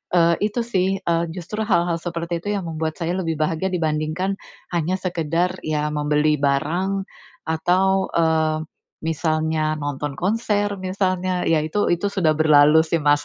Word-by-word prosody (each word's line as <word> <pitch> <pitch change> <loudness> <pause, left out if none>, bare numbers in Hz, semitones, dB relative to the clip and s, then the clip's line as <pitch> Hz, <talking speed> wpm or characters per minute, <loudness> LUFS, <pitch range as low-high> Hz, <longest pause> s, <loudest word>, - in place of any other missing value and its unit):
eee, 170 -1 +5
itu 215 +3 0
sih, 195 -4 0
eee, 170 0 +1
justru 210 +5 -4
hal-hal 170 -4 +2
seperti 170 0 -3
itu 205 +3 -2
yang 195 - -2
membuat 160 -1 -3
saya 170 0 -1
lebih 165 -3 -1
bahagia 160 +4 0
dibandingkan 165 +3 -1 0.3
hanya 175 +2 0
sekadar, 175 0 0 0.2
ya 150 -1 0
membeli 150 0 +1
barang 170 +8 0 0.4
atau, 185 +4 +1
eee, 160 -1 +2 0.5
misalnya 155 -1 0
nonton 145 0 -3
konser, 205 - 0
misalnya. 185 -1 -1
Ya, 160 -1 +3
itu 175 +5 0
itu 175 +4 +1
sudah 170 -6 +2
berlalu 155 0 +5 0.2
masanya, 145 - +5
170 Hz, 140 wpm, -22 LUFS, 155-185 Hz, 0.5 s, eee